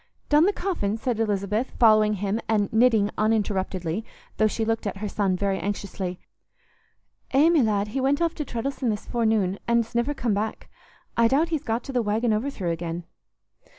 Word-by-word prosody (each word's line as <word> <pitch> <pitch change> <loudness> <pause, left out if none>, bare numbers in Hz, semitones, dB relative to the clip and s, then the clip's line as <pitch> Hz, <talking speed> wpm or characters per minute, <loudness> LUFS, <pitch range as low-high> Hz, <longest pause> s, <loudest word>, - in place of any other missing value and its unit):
"Done 300 +2 +5
the - - +4
coffin?" 335 - -2
said 230 -1 -2
Lisbeth, 210 +2 0
following 215 -2 +5
him, 200 +2 -1
and 210 -2 +1
knitting 220 -3 +4
uninterruptedly, 200 -4 0 0.3
though 215 - +4
she 220 +1 -2
looked 225 -1 -1
at 200 - -4
her 210 +2 -4
son 195 -2 0
very 195 0 0
anxiously. 195 -2 -4 1.1
"Eh, 285 +5 +4
my 335 -2 +4
lad, 210 -3 +1
he 265 +5 -2
went 275 +2 +2
aff 335 -1 +1
to 300 - -4
Treddles'on 255 0 -3
this 210 -2 -3
forenoon, 220 -5 0
an's 235 0 +1
niver 240 +5 0
come 245 -5 0
back. 210 +2 -3 0.4
I 230 0 +4
doubt 295 +7 +2
he's 315 -4 -1
got 230 +1 -2
to 270 - -7
th' 245 -2 +1
'Waggin 220 +2 +1
Overthrow' 215 -6 -2
again." 165 +1 -4
220 Hz, 180 wpm, -25 LUFS, 200-245 Hz, 1.1 s, Done